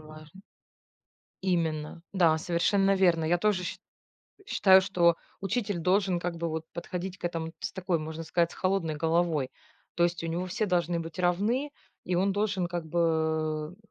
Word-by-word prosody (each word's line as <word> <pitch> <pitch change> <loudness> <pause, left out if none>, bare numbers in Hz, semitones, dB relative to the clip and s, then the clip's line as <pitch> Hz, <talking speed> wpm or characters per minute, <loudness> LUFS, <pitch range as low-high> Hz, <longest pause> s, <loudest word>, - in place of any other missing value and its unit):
важно. 155 +3 -13 1.0
Именно. 165 -3 -1
Да, 170 -4 +4
совершенно 195 +4 +2
верно. 175 -4 +3
Я 175 +2 +2
тоже 190 -1 +1
ш - - -5 0.7
считаю, 190 - +6
что 175 -3 +3 0.3
учитель 205 0 -1
должен 185 +1 +2
как 170 -1 -3
бы 170 - -2
вот 160 0 -3
подходить 180 +2 -5
к - - -6
этому 165 -1 -3
ц - - -4
такой, 180 -3 -1
можно 160 +1 -6
сказать, 170 +1 +1
с - - -10
холодной 185 -5 0
головой. 160 -3 +1 0.5
То 170 - +2
есть 175 -1 0
у - - -2
него 170 +2 -2
все 215 +5 -1
должны 175 -2 0
быть 165 +1 -7
равны 210 +11 +1 0.3
и 180 - 0
он 195 +3 +2
должен 200 -3 0
как 170 -2 -4
бы, 160 -1 0
175 Hz, 165 wpm, -28 LUFS, 160-190 Hz, 1.0 s, считаю